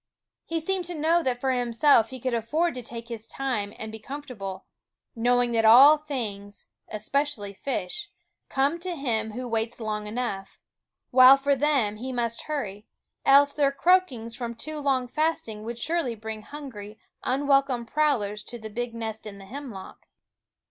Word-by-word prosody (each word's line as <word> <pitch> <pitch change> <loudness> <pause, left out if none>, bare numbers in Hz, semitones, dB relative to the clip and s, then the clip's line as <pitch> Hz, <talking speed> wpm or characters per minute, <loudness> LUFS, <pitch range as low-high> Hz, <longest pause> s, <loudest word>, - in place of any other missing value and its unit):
He 330 0 -2
seemed 370 +2 -1
to 350 0 -4
know 325 +3 +2
that 255 -5 -1
for 265 +1 0
himself 240 -1 +3
he 260 - -8
could 255 0 -2
afford 305 +10 0
to 250 - -6
take 230 0 -8
his 225 -2 -7
time 240 -7 -2
and 220 0 -6
be 220 - -8
comfortable, 220 -8 -7 0.5
knowing 245 +1 +2
that 225 -1 +2
all 260 +7 +9
things, 220 -10 -6 0.2
especially 215 -1 -2
fish, 275 - -4 0.4
come 280 +5 +1
to 355 0 -4
him 220 -7 -1
who 250 +2 -5
waits 225 +1 -2
long 210 -2 -3
enough; 210 -4 -4 0.5
while 255 +2 +9
for 280 +1 +2
them 265 -7 +1
he 255 +4 -5
must 235 -2 -2
hurry, 215 -9 -4 0.4
else 285 +1 +6
their 280 -2 +2
croakings 275 -8 +2
from 240 -2 -5
too 300 +6 -5
long 270 -3 +1
fasting 250 -7 -1
would 235 +1 -5
surely 305 -2 -1
bring 220 0 -6
hungry, 220 -6 -9 0.3
unwelcome 275 -2 +2
prowlers 230 -8 0
to 240 - -6
the 220 -1 -9
big 240 +1 -4
nest 220 -1 -5
in 200 -1 -8
the 195 - -12
hemlock. 235 -4 -9
245 Hz, 160 wpm, -26 LUFS, 220-285 Hz, 0.5 s, all